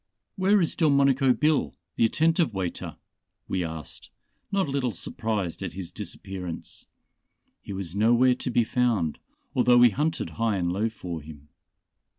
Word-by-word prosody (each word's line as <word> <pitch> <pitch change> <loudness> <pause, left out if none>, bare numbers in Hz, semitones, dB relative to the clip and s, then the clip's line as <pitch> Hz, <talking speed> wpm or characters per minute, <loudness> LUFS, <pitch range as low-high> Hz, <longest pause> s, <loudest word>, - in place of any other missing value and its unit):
"Where 195 +2 +3
is 165 -5 0
Delmonico 140 -4 +4
Bill, 150 +4 +1 0.2
the - - +3
attentive 160 - +2
waiter," 90 -3 -4 0.5
we 95 -1 -1
asked, 80 -2 -7 0.4
not 195 -4 +1
a - - -4
little 135 -2 0
surprised 105 -2 -3
at - - -4
his 95 -1 -6
disappearance. 90 -4 -6 0.7
He - - -9
was 95 -2 -4
nowhere 120 +4 +4
to 125 - -4
be 120 -1 +3
found, 110 -9 0 0.3
although 125 -1 +4
we 120 -1 +7
hunted 155 +8 -1
high 110 -3 +2
and 85 -1 0
low 105 +4 0
for 90 -7 -6
him. 75 -1 -13
115 Hz, 150 wpm, -26 LUFS, 95-140 Hz, 0.7 s, we